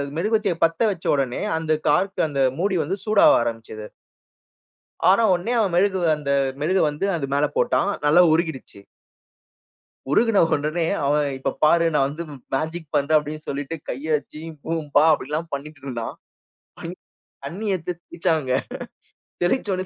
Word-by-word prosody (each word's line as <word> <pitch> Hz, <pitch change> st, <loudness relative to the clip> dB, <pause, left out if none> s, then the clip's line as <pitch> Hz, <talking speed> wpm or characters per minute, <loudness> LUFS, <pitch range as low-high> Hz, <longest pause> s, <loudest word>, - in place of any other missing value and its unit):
மெழுகுவர்த்திய 210 Hz, +1 st, +1 dB
பத்த 165 Hz, 0 st, +2 dB
வச்ச 175 Hz, -4 st, -8 dB
உடனே, 135 Hz, -3 st, -1 dB, 0.2 s
அந்த 160 Hz, -1 st, -3 dB, 0.2 s
கார்க்கு, 190 Hz, +6 st, +1 dB
அந்த 140 Hz, -1 st, -1 dB, 0.2 s
மூடி 195 Hz, +1 st, +1 dB
வந்து 185 Hz, +7 st, -2 dB
சூடாவ 210 Hz, -1 st, +6 dB
ஆரம்பிச்சது. 115 Hz, -2 st, -6 dB, 1.2 s
ஆன 210 Hz, +4 st, +5 dB
உடனே 180 Hz, +7 st, -2 dB
அவன் 195 Hz, -5 st, +1 dB
மெழுகு 190 Hz, +1 st, +2 dB, 0.2 s
அந்த 145 Hz, -2 st, -6 dB, 0.3 s
மெழுகு 185 Hz, +5 st, +2 dB
வந்து 150 Hz, +7 st, -3 dB
அது 150 Hz, -, -2 dB
மேல 145 Hz, +1 st, +2 dB
போட்டான். 200 Hz, -, +2 dB, 0.2 s
நல்லா 160 Hz, +5 st, +6 dB
உருகிடுச்சு. 160 Hz, -, -2 dB, 1.3 s
உருகின 225 Hz, +3 st, +4 dB
உடனே 155 Hz, +3 st, -1 dB, 0.2 s
அவன், 145 Hz, 0 st, +2 dB
"இப்ப 130 Hz, -, -2 dB
பாரு! 170 Hz, +2 st, +5 dB
நான் 135 Hz, -1 st, +3 dB
வந்து 155 Hz, +4 st, -6 dB, 0.3 s
மேஜிக் 160 Hz, +1 st, -4 dB
பண்றேன். 150 Hz, +2 st, +3 dB
அப்பிடின்னு 150 Hz, +1 st, -5 dB
சொல்லிட்டு 145 Hz, +3 st, -4 dB
கைய 155 Hz, +5 st, -2 dB
வச்சு, 145 Hz, -, -13 dB
ஜீபூம்பா" 155 Hz, -1 st, -1 dB
அப்பிடில்லாம் 155 Hz, +3 st, -2 dB
பண்ணிக்கிட்டு 145 Hz, 0 st, -7 dB
இருந்தான். 120 Hz, -4 st, -5 dB, 1.3 s
தண்ணீ 185 Hz, +10 st, -6 dB
எடுத்து 180 Hz, 0 st, -4 dB
தெளிச்சாங்க. 160 Hz, -6 st, -1 dB, 0.9 s
தெளிச்ச 205 Hz, +5 st, +1 dB
உடனே 185 Hz, 0 st, -4 dB
155 Hz, 135 wpm, -23 LUFS, 145-180 Hz, 1.3 s, சூடாவ